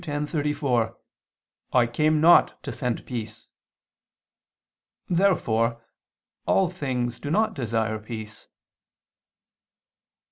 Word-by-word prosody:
10:34): 145 -5 -1 0.8
"I 125 -2 +5
came 150 +6 +1
not 170 +3 +5
to - - -5
send 125 -4 -3
peace." 110 -3 -7 1.6
Therefore 120 - +1 0.7
all 190 -3 +3
things 125 -8 -3
do 145 - -5
not 215 +6 +2
desire 110 - -1
peace. 110 -1 -8
125 Hz, 80 wpm, -25 LUFS, 115-155 Hz, 1.6 s, I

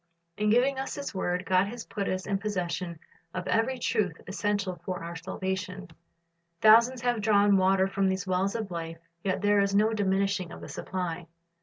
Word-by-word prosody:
In 210 0 +1
giving 260 +4 +3
us 270 - -4
His 280 -4 -5
word, 180 -1 -1
God 185 +3 +3
has 235 +2 -7
put 200 -2 -3
us 185 0 -2
in 200 -1 -1
possession 180 -4 -3 0.4
of 185 -1 -3
every 255 +4 +1
truth 215 -8 0
essential 195 -2 -2
for 180 -1 -4
our 170 +1 -6
salvation. 190 +2 -4 0.7
Thousands 235 +4 +6
have 240 -2 0
drawn 205 -1 +4
water 190 0 +3
from 195 0 +1
these 190 0 -2
wells 190 +2 0
of 215 -4 -3
life, 165 -1 -5 0.3
yet 190 0 -1
there 205 0 +4
is 200 0 +2
no 215 +2 +4
diminishing 195 -3 0
of - - -9
the - - -8
supply. 175 -2 -4
195 Hz, 180 wpm, -28 LUFS, 185-210 Hz, 0.7 s, Thousands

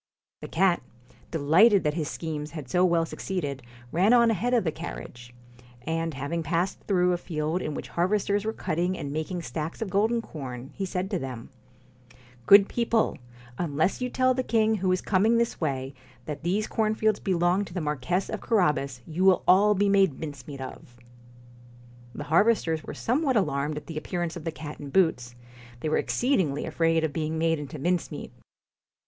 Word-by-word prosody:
The - - -6
cat, 180 +1 +2 0.5
delighted 175 +7 +4
that 150 - +1
his 155 -2 -2
schemes 155 -2 -4
had 155 -5 -8
so 180 +7 +2
well 170 -2 +3
succeeded, 145 -7 -4 0.3
ran 190 +8 +4
on 235 -2 +5
ahead 225 +4 -1
of 235 - +3
the 160 - 0
carriage; 120 -6 -8 0.5
and 165 +1 -2
having 145 +5 -3
passed 170 +4 -1
through 180 -2 +3
a 175 - -1
field 160 +1 -2
in 150 - -3
which - - -6
harvesters 200 +3 +1
were 220 - -1
cutting 180 -2 -2
and 140 - -5
making 165 +3 -3
stacks 155 +4 -5
of 220 -5 -4
golden 220 +5 +2
corn, 135 - -7
he 195 - -3
said 185 +2 -3
to 190 - 0
them: 130 -5 -7 0.4
' 125 -1 -25
Good 200 0 +8
people! 230 -6 0 0.4
unless 160 - 0
you 250 - -1
tell 255 +1 +2
the 255 - 0
king 220 -3 +2
who 185 -1 0
is 185 - +1
coming 215 +4 +3
this 235 -4 -1
way 135 -3 -2 0.3
that 150 -2 -5
these 190 +6 0
cornfields 215 -1 +1
belong 180 +1 +1
to 170 - -12
the - - 0
Marquess 155 +4 -1
of - - -5
Carabas, 150 - +1
you 165 +3 -2
will 190 -2 +5
all 205 +3 +6
be 200 +1 +2
made 195 -7 +3
mincemeat 140 -2 -7
of.' 120 -2 -9 1.2
The 145 - -5
harvesters 165 0 +2
were - - -7
somewhat 265 +1 +1
alarmed 150 -6 0
at 150 - -7
the 160 -2 -5
appearance 175 0 -3
of 170 -2 -8
the 165 - -1
cat 150 -1 -8
in 145 - -7
boots; 130 -8 +1 0.5
they 155 - -1
were - - +2
exceed 255 -1 +1
ingly 145 -5 -1
afraid 165 -1 +1
of 155 -2 -1
being 160 +1 -2
made 165 -1 +1
into 145 +1 -7
mincemeat. 175 +4 -2
170 Hz, 185 wpm, -27 LUFS, 150-195 Hz, 1.2 s, Good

